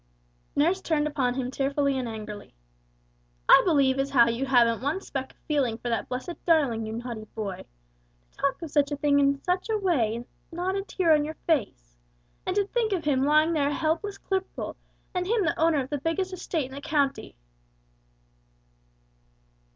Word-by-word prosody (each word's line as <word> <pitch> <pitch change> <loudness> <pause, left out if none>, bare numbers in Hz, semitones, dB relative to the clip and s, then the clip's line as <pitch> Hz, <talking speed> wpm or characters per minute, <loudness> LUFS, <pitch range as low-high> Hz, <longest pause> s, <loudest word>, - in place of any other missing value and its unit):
Nurse 345 +6 +2
turned 305 -4 +1
upon 270 -5 0
him 255 -1 -2
tearfully 280 +1 0
and 255 -2 -2
angrily, 210 - -8 0.9
"I - - +9
believe 275 -6 +3
as 275 +1 0
how 240 -4 +5
you 240 +4 -2
haven't 235 -3 +4
one 285 +8 -1
speck 265 -8 -5
of - - -37
feeling 270 -7 +1
for 240 - -5
that 230 - -2
blessed 260 +8 -5
darling, 275 -10 +2
you 220 - -5
naughty 230 -2 -5
boy! 205 -4 -5 0.7
To - - -31
talk 280 -1 0
of 320 - -6
such 290 -1 +2
a - - 0
thing 285 0 +2
in 280 0 +2
such 370 +4 -1
a 440 - +2
way 275 - +1
with 240 +1 -8 0.2
not 360 +3 -2
a 395 - 0
tear 370 -4 +2
on 300 -1 +3
your 310 +2 -6
face! - - -1 0.5
And 370 - 0
to 405 -1 +2
think 445 0 0
of 345 -5 -2
him 270 -3 +2
laying 310 +2 +4
there 285 -3 +2
a - - -2
helpless 330 +6 -1
cripple, 385 -1 -3 0.4
and 360 -1 -1
him 435 -2 +2
the 335 - -1
owner 320 -2 +3
of 260 - -7
the 290 - -1
biggest 370 +6 -1
estate 330 -4 -2
in 260 - -11
the 280 - -7
county!" 285 -2 -1
285 Hz, 190 wpm, -27 LUFS, 255-335 Hz, 0.9 s, I